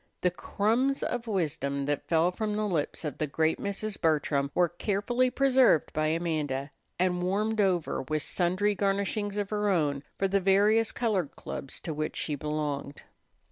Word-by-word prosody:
The 180 - +2
crumbs 230 +9 0
of 240 -1 -2
wisdom 145 -8 -1
that 145 0 -2
fell 165 +2 +3
from 210 +2 -2
the 215 0 0
lips 165 -3 -2
of 150 - -4
the 155 - 0
great 160 +3 +1
Mrs. 200 +1 -3
Bertram 150 -3 +1
were 175 -1 +4
carefully 205 +8 0
preserved 260 - +3
by 155 0 +1
Amanda, 155 -4 -1 0.3
and 180 0 +1
warmed 210 +4 +1
over, 180 -5 +1
with 155 +3 -2
sundry 185 +4 +1
garnishings 200 +1 0
of 205 0 -2
her 210 -1 +1
own, 150 -7 +1 0.2
for 195 - +1
the 195 +1 +1
various 205 +4 +4
colored 205 - -1
clubs 135 - -6
to 160 - -4
which 155 +1 -3
she 150 - -1
belonged. 145 -1 -3
180 Hz, 165 wpm, -28 LUFS, 155-210 Hz, 0.3 s, were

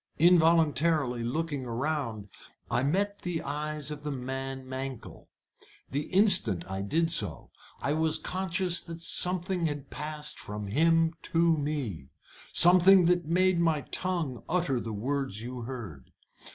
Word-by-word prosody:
Involuntarily 160 -6 +3
looking 145 +2 -3
round, 120 -4 -3 0.4
I - - +1
met 200 +9 0
the 175 -2 -3
eyes 150 +1 -4
of 150 -1 -7
the 150 - -5
man 135 0 -5
Mankell. 130 -1 -7 0.6
The 145 +2 -2
instant 185 - +4
I 95 0 -4
did 160 +11 0
so 100 - -1 0.3
I 140 - -1
was 160 0 +4
conscious 185 -1 -1
that 165 0 -10
something 180 0 +1
had 145 -2 -6
passed 150 0 -4
from 105 0 -6
him 165 +8 +2 0.2
to 165 0 +3
me, 140 - -4 0.4
something 180 +1 +6
that 175 -1 +2
made 185 +1 +2
my 165 -3 +1
tongue 170 -9 -3
utter 160 -7 0
the 115 - -6
words 125 0 -3
you 125 +1 -6
heard. 115 - -8
150 Hz, 135 wpm, -28 LUFS, 130-170 Hz, 0.6 s, something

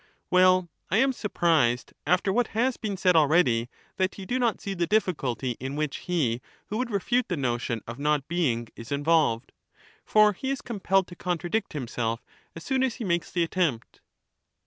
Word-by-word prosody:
Well, 185 0 +5 0.2
I 195 - +2
am 265 +3 +3
surprised, 165 - +1
after 190 +2 +2
what 240 +1 +2
has 255 +1 +2
been 205 -3 -4
said 180 -1 +3
already, 145 -7 +3 0.3
that 190 0 0
you 195 - -7
do 250 +5 -1
not 235 -3 +1
see 200 - -4
the 175 -2 -1
difficulty 140 - 0
in 135 +2 -4
which 150 -2 -2
he 130 -9 +1 0.3
who 215 - -2
would 250 -1 -1
refute 240 +4 0
the 180 - -2
notion 120 -4 -2
of 115 +3 -7
not 150 -1 +1
being 130 -10 0
is 115 +2 -10
involved. 145 -5 +2 0.5
For 215 -1 +5
he 265 +8 -4
is 275 0 -1
com 230 -4 -6
pelled 195 0 +2
to 175 - -10
contradict 180 +5 -2
himself 120 -4 -3 0.3
as 165 - -8
soon 265 -1 0
as 260 -3 +1
he 245 - -6
makes 170 -4 0
the 175 - +1
attempt. 165 -8 -2
175 Hz, 185 wpm, -27 LUFS, 135-205 Hz, 0.5 s, Well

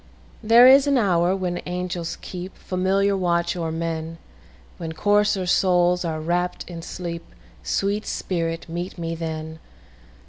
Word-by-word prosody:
There 230 +2 +7
is 270 +2 +7
an 280 -1 +3
hour 180 -4 +2
when 180 -2 -3
angels 180 -1 -4
keepFamiliar 190 +2 -1
watch 175 -2 0
o'er 165 -2 -3
men, 165 0 -4 0.6
When 165 -2 -5
coarser 205 +1 +2
souls 180 0 +3
are 160 -2 -2
wrapp'd 175 +3 -1
in 170 -2 -7
sleep—Sweet 170 - -4
spirit, 165 -2 -3
meet 175 +3 -5
me 165 -1 -3
then! 160 -1 -5
175 Hz, 125 wpm, -23 LUFS, 165-190 Hz, 0.6 s, There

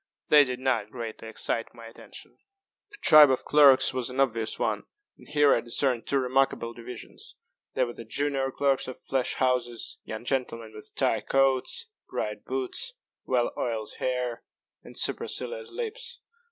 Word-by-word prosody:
They 150 -1 +8
did 125 -2 -4
not 125 -5 0
greatly 115 -2 -7
excite 115 +1 -3
my 115 -1 -11
attention. 115 - -13 0.5
The 415 - -13
tribe 150 -2 +9
of 130 - 0
clerks 140 -3 +6
was 130 -2 -2
an 130 +1 -5
obvious 115 -5 +1
one - - -1 0.3
and - - -18
here 145 -1 +4
I - - +2
discerned 120 +1 0
two 140 - +1
remarkable 130 -2 +1
divisions. 120 0 -10 0.4
There 130 - +2
were 120 - -7
the 115 - -9
junior 135 +3 -1
clerks 135 0 0
of 130 - -8
flash 130 -2 -1
houses 125 -2 -1
young 110 +2 -7
gentlemen 115 -4 -2
with 105 - -12
tight - - 0
coats, 135 - +2 0.2
bright - - -4
boots, 390 +5 -2 0.3
well 125 -2 +1
oiled 110 -3 -3
hair, 125 -2 -2 0.4
and - - -11
supercilious 480 -2 -2
lips. 480 +1 -4
130 Hz, 155 wpm, -27 LUFS, 115-140 Hz, 0.5 s, tribe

